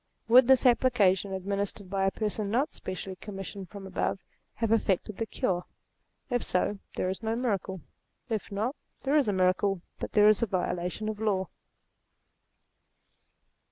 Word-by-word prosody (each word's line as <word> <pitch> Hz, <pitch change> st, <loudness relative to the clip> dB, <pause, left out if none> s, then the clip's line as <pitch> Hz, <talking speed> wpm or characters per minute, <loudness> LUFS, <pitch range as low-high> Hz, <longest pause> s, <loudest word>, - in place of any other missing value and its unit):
Would 245 Hz, +2 st, +7 dB
this 265 Hz, -1 st, +5 dB
application, 220 Hz, -6 st, +4 dB
administered 200 Hz, +1 st, -2 dB
by 195 Hz, 0 st, 0 dB
a -, -, +4 dB
person 210 Hz, -1 st, -2 dB
not 255 Hz, +8 st, +1 dB
spe -, -, -10 dB
cially 185 Hz, 0 st, -7 dB
commissioned 195 Hz, -2 st, -7 dB
from 200 Hz, -2 st, -9 dB
above, 190 Hz, 0 st, -1 dB, 0.4 s
have 225 Hz, -2 st, -1 dB
effected 210 Hz, -2 st, +1 dB
the 225 Hz, -, -2 dB
cure? 180 Hz, -4 st, -1 dB, 0.7 s
If 245 Hz, -1 st, +2 dB
so, 195 Hz, +2 st, 0 dB, 0.2 s
there -, -, 0 dB
is 190 Hz, +2 st, -3 dB
no 225 Hz, 0 st, -1 dB
miracle; 200 Hz, -6 st, -2 dB, 0.5 s
if 220 Hz, -3 st, -3 dB
not, 220 Hz, +8 st, -1 dB, 0.3 s
there 280 Hz, +2 st, +1 dB
is 290 Hz, -5 st, +4 dB
a -, -, +3 dB
miracle, 185 Hz, 0 st, +2 dB, 0.2 s
but -, -, -5 dB
there 210 Hz, 0 st, +6 dB
is 215 Hz, -1 st, +5 dB
a 230 Hz, -, +2 dB
violation 180 Hz, +2 st, -2 dB
of 215 Hz, -1 st, -3 dB
law. 195 Hz, -4 st, 0 dB
205 Hz, 160 wpm, -29 LUFS, 190-225 Hz, 0.7 s, Would